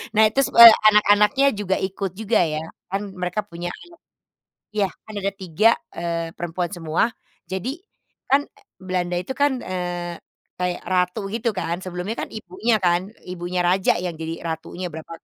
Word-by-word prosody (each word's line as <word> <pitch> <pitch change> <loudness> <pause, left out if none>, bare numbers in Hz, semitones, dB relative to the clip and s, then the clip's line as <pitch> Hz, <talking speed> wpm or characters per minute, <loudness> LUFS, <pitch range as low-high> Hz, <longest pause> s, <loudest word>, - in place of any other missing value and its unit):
Nah 220 - +6
terus, 275 +3 +2
eee, 235 -1 +12 0.2
anak-anaknya 210 +5 +4
juga 190 -2 0
ikut 190 -1 -3
juga 220 +2 +1
ya. 155 -1 -2 0.3
Kan 195 +1 -1
mereka 180 +3 -3
punya 175 -2 -7
anak 345 - -15 0.9
iya, 200 -2 +2 0.2
kan 215 - -11
ada 200 0 -1
3, 195 +3 +2 0.3
eee, 170 -1 -3
perempuan 175 +1 -3
semua. 165 -2 0 0.4
Jadi 245 - -4 0.5
kan, 280 +2 +4
eee, 420 -1 -25
Belanda 180 -1 -2
itu 180 +9 -3
kan, 270 -2 +1
eee, 175 -2 -4 0.4
kayak 180 -1 -1
ratu 180 +2 +1
begitu 230 +3 -2
kan, 170 0 -2
sebelumnya 185 +4 -4
kan - - -5
ibunya 215 +3 -1
kan, 175 -2 +2 0.3
ibunya 180 0 -3
raja 185 +2 +3
yang 175 -2 -3
jadi 165 +1 -5
ratunya 165 +3 -5
berapa 160 +1 -9
185 Hz, 160 wpm, -22 LUFS, 175-210 Hz, 0.9 s, eee